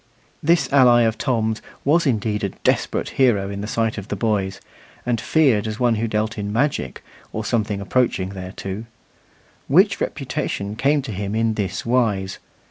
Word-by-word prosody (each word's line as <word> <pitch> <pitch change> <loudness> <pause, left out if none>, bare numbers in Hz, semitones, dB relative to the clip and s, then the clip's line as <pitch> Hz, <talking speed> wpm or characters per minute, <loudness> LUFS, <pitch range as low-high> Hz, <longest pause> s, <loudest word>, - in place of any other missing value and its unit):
This 170 +3 +3
ally 125 -3 +6
of 110 -1 0
Tom's 110 -3 0 0.2
was 160 +3 +3
indeed 105 -4 0
a 100 - +1
desperate - - -1
hero 100 -6 +3
in 100 0 -5
the 105 - -4
sight 115 0 -1
of 100 - -9
the - - -3
boys, 100 -2 -1 0.5
and 120 -2 0
feared 130 -10 +3
as 110 0 -4
one 120 -2 +3
who 115 +1 -1
dealt 110 +1 -1
in 100 0 -3
magic, 120 - -1 0.3
or 110 0 -4
something 110 -4 0
approaching 100 -2 0
thereto. 95 +2 -6 0.8
Which - - +4
reputation 100 +1 -3
came 140 +4 +2
to 125 - -5
him 100 +1 -3
in 115 0 +1
this 100 -4 -3
wise. 110 -6 0
110 Hz, 165 wpm, -22 LUFS, 100-120 Hz, 0.8 s, ally